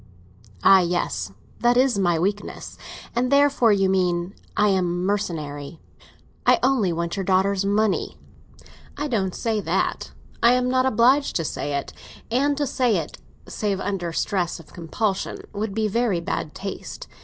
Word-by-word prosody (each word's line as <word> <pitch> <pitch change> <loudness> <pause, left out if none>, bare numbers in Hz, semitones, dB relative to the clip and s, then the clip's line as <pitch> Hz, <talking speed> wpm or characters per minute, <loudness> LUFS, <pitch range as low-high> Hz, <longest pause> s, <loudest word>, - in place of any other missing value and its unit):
"Ah, 195 - +8
yes; 170 - -1 0.3
that 240 0 +3
is 255 -5 +3
my 175 -3 +2
weakness! 200 +5 -3 0.4
And 250 +2 +1
therefore, 280 -5 +4
you 195 -2 +3
mean, 180 -1 0 0.2
I 210 0 +4
am 180 -2 0
mercenary—I 160 -7 -3
only 250 -8 +3
want 170 +1 -2
your 195 - -1
daughter's 190 +1 +2
money." 210 +1 0 0.8
"I 295 +1 -2
don't 195 -8 -1
say 225 -3 -1
that. - - -1 0.3
I 235 +1 +6
am 250 0 +1
not 255 0 +3
obliged 260 +4 +3
to 165 - 0
say 145 -1 -3
it; 140 - -6 0.4
and 280 +4 +2
to 290 - +1
say 245 -5 +1
it, 160 - -5 0.3
save 200 -3 -2
under 190 -4 -2
stress 175 0 -1
of 160 - -16
compulsion, 190 +4 -2
would 205 -1 -3
be 220 -1 +1
very 215 -3 +1
bad 160 -2 -4
taste. 200 - -7
200 Hz, 150 wpm, -23 LUFS, 175-240 Hz, 0.8 s, Ah